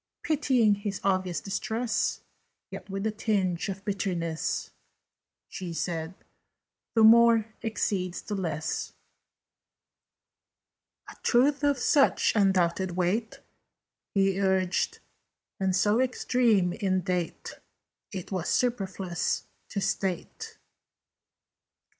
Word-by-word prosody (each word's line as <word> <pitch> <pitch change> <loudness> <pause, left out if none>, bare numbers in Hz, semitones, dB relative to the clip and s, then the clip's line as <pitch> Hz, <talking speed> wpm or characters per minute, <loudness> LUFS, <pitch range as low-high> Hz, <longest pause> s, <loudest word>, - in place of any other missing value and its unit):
Pitying 260 -8 +3
his 200 -1 -4
obvious 185 -2 0
distress, 225 +4 -1 0.5
Yet - - -9
with 195 +1 -3
a 220 - +1
tinge 200 -4 -1
of 195 +1 -6
bitterness, 175 -5 -2 0.8
She 180 -3 -6
said 165 +1 -3 0.8
"The 225 - +5
More 225 -1 +6
exceeds 190 -5 -2
the 210 - -5
Less." 160 -5 -3 2.1
"A - - -11
truth 275 +4 +3
of 285 -1 +3
such 275 +2 +3
undoubted 185 -2 +2
weight," 200 +6 -1 0.7
He 195 0 +2
urged, 190 -2 +1 0.6
"and 190 -1 +1
so 210 +5 +3
extreme 235 -7 +2
in 185 -2 0
date, 180 -1 -3 0.5
It 190 -1 -7
were 185 -3 -1
superfluous 195 -7 -1 0.3
to 200 - -3
state." 190 -3 -3
195 Hz, 95 wpm, -28 LUFS, 180-225 Hz, 2.1 s, More